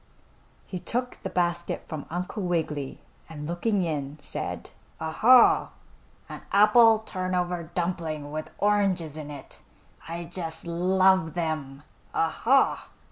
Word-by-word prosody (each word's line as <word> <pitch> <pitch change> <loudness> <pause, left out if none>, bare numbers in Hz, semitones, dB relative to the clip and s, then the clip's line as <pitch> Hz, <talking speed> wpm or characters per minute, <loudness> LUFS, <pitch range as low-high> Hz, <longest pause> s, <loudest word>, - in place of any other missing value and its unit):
He 185 - -6
took 250 +6 -3
the - - -4
basket 175 -1 -1
from 155 -3 -6
Uncle 180 +5 -4
Wiggily, 160 -6 -2 0.3
and 150 -2 -7
looking 185 +4 0
in, 150 -3 -3
said: 145 - -5 0.3
"Ah, 160 0 -3
ha! 245 +8 +6 0.6
An - - -8
apple 220 +2 +6
turnover 180 -3 -2
dumpling 165 -5 -2
with 155 +1 -5
oranges 195 -6 +1
in 155 -2 -7
it! 145 -2 -10 0.5
I 170 +1 -5
just 165 -1 -6
love 185 0 +2
them! 155 -5 -3 0.3
Ah, 165 - +2
ha!" 265 +9 +2
175 Hz, 125 wpm, -26 LUFS, 155-190 Hz, 0.6 s, ha